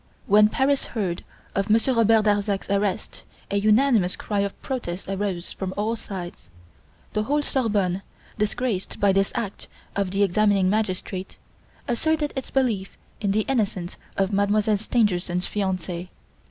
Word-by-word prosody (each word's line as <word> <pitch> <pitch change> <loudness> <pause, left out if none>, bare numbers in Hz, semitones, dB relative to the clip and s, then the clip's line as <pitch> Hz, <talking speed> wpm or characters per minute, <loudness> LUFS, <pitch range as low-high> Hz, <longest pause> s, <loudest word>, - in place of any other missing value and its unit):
When 210 +1 +6
Paris 275 +4 +1
heard 180 -5 -1 0.3
of 195 +2 -1
Monsieur 225 +5 +4
Robert 225 -2 +4
Darzac's 205 -1 +1
arrest 200 -1 -1 0.3
a 200 - +2
unanimous 215 -3 +4
cry 205 -2 -2
of 200 0 -2
protest 195 -9 -4
arose 195 -2 -2
from 190 -1 -4
all 215 +3 0
sides. 175 - -7 0.6
The 215 - +1
whole 295 +3 +1
Sorbonne, 205 -9 0 0.3
disgraced 210 -1 -2
by 200 -1 +4
this 195 0 +2
act 205 -4 -4 0.3
of 200 -2 0
the 195 +2 +2
examining 200 -1 +3
magistrate, 190 -3 -2 0.5
asserted 295 +5 0
its 265 - -4
belief 230 -8 0 0.2
in 205 - 0
the 210 +2 +3
innocence 205 -8 -1 0.2
of 195 +1 +1
Mademoiselle 205 +1 +3
Stangerson's 190 -5 +1
fiance. 185 -3 -2
205 Hz, 140 wpm, -24 LUFS, 190-220 Hz, 0.6 s, When